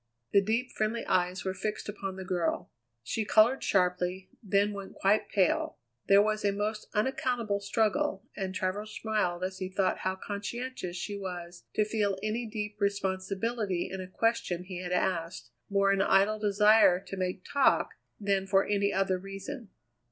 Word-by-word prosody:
The 200 - +7
deep, 230 +5 -1
friendly 220 +2 -1
eyes 180 +1 +1
were 190 - 0
fixed 210 +3 -4
upon 195 -2 -5
the 190 0 -7
girl. 180 -3 -1 0.3
She 220 - -1
coloured 220 +5 +4
sharply, 180 0 0
then 205 -1 +2
went 195 -1 -8
quite 205 +2 +2
pale. 190 -4 +1 0.3
There 200 +1 +7
was 215 0 0
a 200 - +3
most 210 +2 -3
unaccountable 235 -2 0
struggle, 205 -1 0
and 190 -1 -4
Travers 205 +4 -2
smiled 205 -5 0
as 185 0 -3
he 185 -1 -3
thought 190 0 0
how 185 0 -1
conscientious 205 0 -5
she 205 +4 -4
was 175 -3 -7
to 215 - +3
feel 210 -3 0
any 225 +2 -1
deep 210 -1 -4
responsibility 195 0 -1
in 190 0 -4
a 185 - -7
question 185 -3 0
he 185 -1 -6
had 180 -1 -5
asked, 175 -8 -1 0.2
more 195 0 +3
in 195 - +2
idle 200 +2 +3
desire 210 -2 +5
to 195 0 -7
make 185 0 -3
talk 280 -1 +3 0.3
than 195 -2 0
for 195 0 +4
any 200 -1 +1
other 190 -1 +1
reason. 195 +5 -7
200 Hz, 165 wpm, -30 LUFS, 185-215 Hz, 0.3 s, The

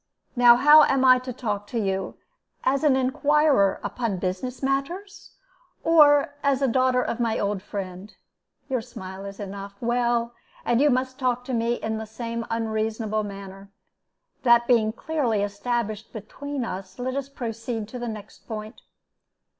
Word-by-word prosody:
Now 240 -1 +7
how 295 +5 +8
am 270 -1 +2
I 255 -1 +7
to 255 0 -6
talk 210 -4 -4
to 235 - -3
you 195 -2 -2 0.5
as 275 +3 +1
an 290 -3 +4
inquirer 265 -4 +3
upon 230 -6 -2
business 190 +9 -4
matters, 335 +10 -3 0.5
or 290 -3 +5
as 280 -2 +2
the 270 - +3
daughter 255 0 +2
of 235 - -3
my 230 -2 0
old 200 -1 -1
friend? 195 0 -7 0.6
Your 255 -3 -1
smile 195 -5 -9
is 200 0 -8
enough. 200 0 -7
Well, 240 0 0 0.3
and 240 +2 +2
you 295 - +5
must 260 +1 -1
talk 250 -2 0
to 260 - -4
me 235 0 +1
in 220 -1 -3
the 220 - -6
same 230 +1 -5
unreasonable 220 -1 -1
manner. 195 -1 -9 0.7
That 235 -1 +5
being 230 -3 +3
clearly 240 -5 -1
established 215 +1 -3
between 265 +5 -5
us, 190 -2 -7
let 255 +1 -3
us 275 0 -3
proceed 230 -4 -5
to 250 - -7
the 240 - -4
next 215 -1 -10
point. 215 0 -7
235 Hz, 155 wpm, -25 LUFS, 210-260 Hz, 0.7 s, how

